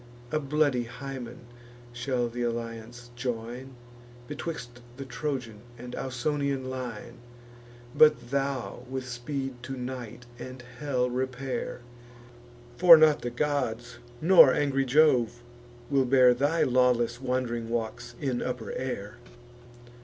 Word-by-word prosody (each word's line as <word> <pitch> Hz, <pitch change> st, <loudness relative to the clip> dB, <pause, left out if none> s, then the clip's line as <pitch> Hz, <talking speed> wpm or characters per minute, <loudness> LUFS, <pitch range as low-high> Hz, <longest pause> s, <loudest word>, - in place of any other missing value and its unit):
A 155 Hz, -, +1 dB
bloody 140 Hz, -4 st, +1 dB
Hymen 125 Hz, -1 st, -7 dB, 0.5 s
shall 120 Hz, 0 st, -1 dB
th' 120 Hz, +1 st, -10 dB
alliance 120 Hz, 0 st, -4 dB
join 120 Hz, +1 st, -5 dB, 0.5 s
Betwixt 140 Hz, -5 st, -6 dB, 0.2 s
the 135 Hz, -, -6 dB
Trojan 130 Hz, -6 st, -4 dB, 0.2 s
and 125 Hz, +1 st, -9 dB
Ausonian 135 Hz, +1 st, -2 dB
line: 120 Hz, -2 st, -6 dB, 0.7 s
But 145 Hz, -6 st, +4 dB
thou 140 Hz, -2 st, -2 dB
with 130 Hz, -1 st, -4 dB
speed 130 Hz, +1 st, -5 dB
to 130 Hz, +2 st, -6 dB
night 125 Hz, -2 st, -6 dB
and 130 Hz, 0 st, -8 dB, 0.2 s
hell 130 Hz, -4 st, 0 dB
repair; 130 Hz, 0 st, -3 dB, 1.0 s
For 175 Hz, -2 st, +10 dB
not 155 Hz, -1 st, +5 dB
the 120 Hz, -, -2 dB
gods, 120 Hz, -3 st, -2 dB, 0.2 s
nor 170 Hz, -5 st, +8 dB
angry 135 Hz, -1 st, +1 dB
Jove, 125 Hz, -4 st, +3 dB, 0.5 s
will 135 Hz, -2 st, +3 dB
bear 125 Hz, -1 st, +6 dB
Thy 145 Hz, +6 st, +1 dB
lawless 125 Hz, -1 st, +2 dB
wand'ring 125 Hz, -3 st, -2 dB
walks 120 Hz, +1 st, -4 dB
in 130 Hz, -4 st, -1 dB
upper 125 Hz, -3 st, -4 dB
air. 120 Hz, -4 st, -5 dB
125 Hz, 115 wpm, -28 LUFS, 120-135 Hz, 1.0 s, For